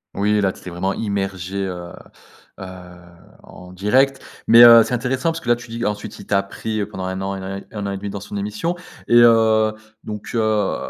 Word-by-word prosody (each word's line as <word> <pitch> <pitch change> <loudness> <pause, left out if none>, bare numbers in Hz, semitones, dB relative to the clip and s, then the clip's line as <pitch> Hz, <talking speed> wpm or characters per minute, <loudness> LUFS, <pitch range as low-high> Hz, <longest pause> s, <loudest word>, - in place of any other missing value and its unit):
Oui, 105 +1 +1
là, 95 -1 +1
tu - - -16
t'étais 90 - -9
vraiment 95 +3 -2
immergé, 95 -2 -3
heu 90 -1 -7 0.7
heu, 95 - -7 0.8
en 90 0 -13
direct 130 +9 +1 0.3
mais 115 +1 +8
heu, 115 -1 +9
c'est 125 - -5
intéressant 130 +5 -1
parce 165 - -5
que, 125 - -14
là, 120 - +5
tu 120 0 -12
dis 115 +1 -4
ensuite, 105 0 -4
il - - -11
t'a 100 0 +1
pris, 110 +2 -5
heu, 100 - -3
pendant 95 -3 -6
1 95 +1 -4
an 95 0 -3
et - - -6
né 95 +1 -7
1 105 -2 -5
an 100 - -2
et 100 - -4
1/2 100 +1 -6
dans 100 - -6
son 100 +1 -9
émission 105 - -3 0.3
et - - +3
heu, 110 -2 +4 0.3
donc 105 -1 -7
heu, 110 -2 +1
105 Hz, 220 wpm, -20 LUFS, 95-115 Hz, 0.8 s, heu